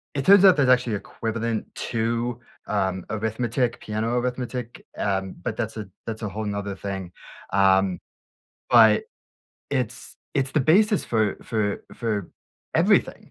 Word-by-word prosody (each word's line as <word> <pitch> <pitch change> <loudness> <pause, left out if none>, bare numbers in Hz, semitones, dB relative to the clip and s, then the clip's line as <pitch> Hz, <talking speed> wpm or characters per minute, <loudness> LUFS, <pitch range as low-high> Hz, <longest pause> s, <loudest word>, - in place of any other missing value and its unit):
It 140 - -1
turns 200 +4 +7
out 190 -2 +8
there's 140 -3 +3
actually 125 -3 +3
equivalent 115 +2 -3
to, 115 +1 -2 0.3
um, 95 -3 -1
arithmetic, 115 +3 -1
piano 110 +3 -2
arithmetic, 125 -1 -4
um, 95 -1 -1
but - - -3
that's 110 -2 -3
a 105 -3 -6 0.2
that's 115 0 -5
a 105 - -2
whole 110 +3 -5
‘nother 100 -1 -4
thing, 95 -3 -5 0.4
um, 95 -1 +3 0.7
but, 110 -3 +6 0.7
it's 125 -3 -3 0.2
it's 135 -1 0
the 150 - +1
basis 205 - +4
for 110 -3 0
for 105 -3 -1
for 105 -5 -2 0.5
everything, - - +2
110 Hz, 135 wpm, -24 LUFS, 100-125 Hz, 0.7 s, out